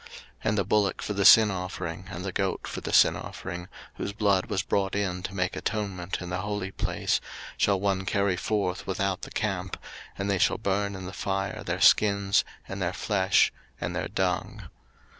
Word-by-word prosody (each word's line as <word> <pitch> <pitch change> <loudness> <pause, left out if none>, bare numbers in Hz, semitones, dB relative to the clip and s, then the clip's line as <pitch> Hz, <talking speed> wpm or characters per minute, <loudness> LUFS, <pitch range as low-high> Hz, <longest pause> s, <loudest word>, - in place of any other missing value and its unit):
03:016:027 - - -16 0.4
And 105 - +2
the 100 - +3
bullock 100 0 +1
for 105 - -2
the 100 -1 0
sin 110 -2 +9
offering, 90 -1 -5
and 90 -1 -6
the 95 - -2
goat 95 0 -1
for - - -5
the - - -4
sin - - +6
offering, 85 +1 -6 0.3
whose 100 - -3
blood 100 -3 +2
was 100 -4 -1
brought 95 0 0
in 95 -3 -1
to 95 +1 -6
make 90 -1 -1
atonement 100 -5 -3
in 90 - -6
the 90 - -1
holy 105 -1 -3
place, - - -1 0.3
shall 100 -2 +2
one 95 -1 0
carry 100 -1 +1
forth 95 -2 -1
without 95 0 -1
the - - -7
camp; - - -2 0.4
and 100 - -2
they 100 -2 +1
shall - - +3
burn 100 0 -1
in 95 -1 -7
the 95 - -7
fire 95 +2 -2
their - - -2
skins, 100 -2 +5 0.2
and 95 0 -5
their 90 0 0
flesh, 95 -2 +2 0.3
and - - -3
their - - -2
dung. - - -2
95 Hz, 195 wpm, -27 LUFS, 95-100 Hz, 0.4 s, sin